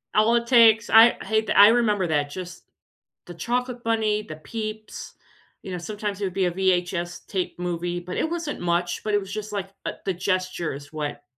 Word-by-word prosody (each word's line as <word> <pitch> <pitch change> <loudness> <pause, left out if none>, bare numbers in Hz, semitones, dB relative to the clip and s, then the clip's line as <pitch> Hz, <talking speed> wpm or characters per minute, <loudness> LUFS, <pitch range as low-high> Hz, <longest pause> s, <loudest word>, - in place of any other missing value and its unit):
All 215 +2 +4
it 235 0 0
takes 225 -3 +5
I 225 +2 +7
hey 220 +2 +1
th 220 - -3
I 205 - +9
remember 215 -5 +2
that. 145 -2 0
Just 180 +3 -8 0.6
the 175 - -9
chocolate 245 +7 -3
bunny, 220 -2 +1
the 155 -7 -9
peeps, 215 +7 -7 0.5
you 190 - -8
know, 180 - -3
sometimes 205 +2 -5
it - - 0
would 185 - -4
be 190 0 +1
a 175 - +1
VHS 175 -1 -1
tape 185 -3 -3
movie, 175 0 -3
but 180 +1 -6
it 320 - 0
wasn't 335 -3 -4
much, 175 0 -1
but 215 - -2
it 205 - +4
was 195 -1 -9
just, 215 0 -5
like, 195 -2 -3 0.2
uh, - - -2
the 190 - 0
gestures 180 -6 -3
what 145 -1 -4
195 Hz, 200 wpm, -24 LUFS, 175-220 Hz, 0.6 s, I